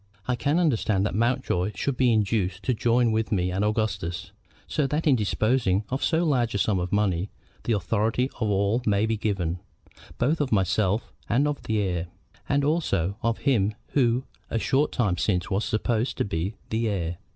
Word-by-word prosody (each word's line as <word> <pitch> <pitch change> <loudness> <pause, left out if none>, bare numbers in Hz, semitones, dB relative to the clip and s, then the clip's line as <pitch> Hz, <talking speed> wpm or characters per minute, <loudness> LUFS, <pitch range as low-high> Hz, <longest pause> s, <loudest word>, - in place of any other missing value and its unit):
I 125 - +1
can 145 +6 0
understand 110 - +2
that - - -1
Mountjoy 115 -4 0
should 140 - -1
be 125 -1 +3
induced 100 -3 0
to 125 - +1
join 120 +1 +2
with 110 0 -1
me 90 -3 +1
and 95 +3 0
Augustus, 100 -5 -2 0.3
so 145 -3 0
that 150 +4 -1
in 145 -4 +5
disposing 110 -2 +1
of 130 +2 -2
so 165 0 +2
large 125 -9 +1
a - - +2
sum 100 -1 +1
of 90 0 -3
money 100 -2 +1 0.4
the 120 - +1
authority 110 +5 +1
of 110 -3 0
all 100 +4 +1
may 105 0 +3
be 110 0 0
given, 95 -5 -2 0.6
both 150 +3 +1
of 140 - -1
myself 100 +1 +1 0.2
and 135 +5 +3
of 145 -1 -2
the 110 - -1
heir, 90 -4 -1 0.4
and 140 0 +2
also 100 - 0
of 115 0 0
him 110 -7 +2
who 125 -2 +2 0.3
a - - -1
short 135 +5 +1
time 105 -8 0
since 90 -2 0
was 100 +3 0
supposed 115 +2 -1
to - - 0
be 95 +3 -3 0.2
the 110 0 0
heir. 85 -4 -2
110 Hz, 185 wpm, -26 LUFS, 95-125 Hz, 0.6 s, in